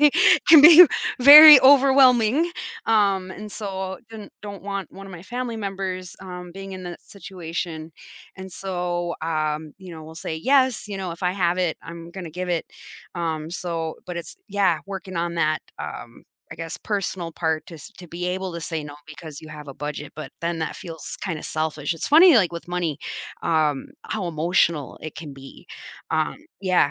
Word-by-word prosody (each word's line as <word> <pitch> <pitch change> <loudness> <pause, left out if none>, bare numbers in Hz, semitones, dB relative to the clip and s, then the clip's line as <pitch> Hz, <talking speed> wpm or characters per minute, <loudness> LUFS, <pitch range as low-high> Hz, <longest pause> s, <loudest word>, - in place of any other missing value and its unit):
it 300 +5 +4
can 310 -3 +9
be 340 +2 +10 0.3
very 295 +1 +11
overwhelming, 265 +1 +5 0.4
um, 195 -4 +1
and 210 +2 -9
so, 190 -2 -5
don 220 -2 -10
don't 200 -2 -9
want 200 -1 -5
one 195 +1 -12
of 190 - -11
my 170 - -10
family 240 +3 -5
members, 190 -3 -5
um, 180 -2 -9
being 195 0 -8
in 185 -1 -8
that 175 -1 -9
situation, 165 -4 -7 0.4
and 190 0 -9
so, 175 -2 -4
um, 155 -1 -3
you 185 -2 -12
know, 160 - -10
we'll 160 +1 -12
say, 160 -1 -5
yes, 260 - +1
you 200 - -5
know, 185 -2 -5
if 170 - -10
I 180 0 +1
have 180 -2 0
it, 175 -3 0
I'm 170 0 -10
gonna 175 -3 -8
give 180 +2 -5
it, 170 -2 -1 0.5
um, 160 -2 -4
so 165 -2 -4
but 180 -1 -6
it's 170 - -8
yeah 195 -5 +1
working 190 -2 -7
on 170 0 -2
that, 155 -2 0 0.2
um, - - -8 0.3
I - - -13
guess, 165 0 -6
personal 190 -4 -4
part, 160 -2 -2
to 170 - -11
s 150 - -12
to 175 -2 -12
be 175 +2 -5
able 185 0 -3
to 170 - -5
say 160 -1 -4
no, 145 - -9
because 155 -2 -11
you 155 - -12
have 150 -1 -10
a 135 - -9
budget, 150 0 -6
but 155 - -8
then 170 0 -2
that 160 - -4
feels 165 -3 -9
kinda 170 -6 -4
selfish. 155 0 -3
It's 165 - -5
funny, 330 +2 +7
like 185 -6 +3
with 170 - -8
money, 170 -5 -2 0.4
um, 155 -4 0 0.2
how 200 -5 -4
emotional 165 -2 0
it 155 - -7
can 150 -4 -9
be, 135 0 -14 0.4
um 155 -1 0 0.3
yeah. 185 -7 +2
180 Hz, 185 wpm, -22 LUFS, 160-195 Hz, 0.5 s, very